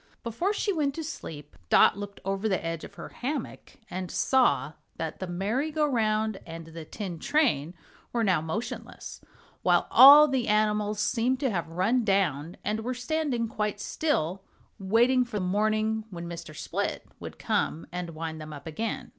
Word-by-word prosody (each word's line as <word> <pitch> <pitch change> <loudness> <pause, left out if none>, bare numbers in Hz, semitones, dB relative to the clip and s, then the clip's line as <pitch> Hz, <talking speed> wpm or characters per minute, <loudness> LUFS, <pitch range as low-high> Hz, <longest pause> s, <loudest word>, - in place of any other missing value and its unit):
Before 240 - -1
she 415 -1 0
went 290 -4 0
to 325 - -4
sleep 150 - -8
Dot - - +6
looked 200 0 -8
over 195 +2 -1
the 190 -4 -1
edge 165 -1 -3
of - - -10
her - - -8
hammock 270 0 -5
and 185 0 -5
saw 260 - +2 0.2
that 160 -1 -5
the 185 - -4
merry 205 - -1
go 305 0 +1
round 220 -5 0
and 165 0 -8
the 165 0 -9
tin 180 -2 -6
train 175 - +1 0.4
were 235 -1 0
now 185 -6 +2
motionless, 215 +10 -6 0.4
while - - +3
all 290 +3 +10
the 265 -4 -1
animals 210 0 +1
seemed 250 +4 +1
to 265 -4 +1
have 170 -5 -2
run 195 +9 +1
down 180 -6 0
and 215 +1 -1
were 250 +3 -3
standing 250 -2 -1
quite 210 -2 -2
still 195 - -1 0.4
waiting 235 +6 +3
for 235 -4 -4
morning, 215 +3 0
when 170 -3 -7
Mr. 170 -2 -8
Split - - -3
would - - -8
come 160 - -1
and 175 -2 -5
wind 160 0 -5
them 155 0 -8
up 145 -1 -10
again. 225 - -4
210 Hz, 170 wpm, -27 LUFS, 170-250 Hz, 0.4 s, all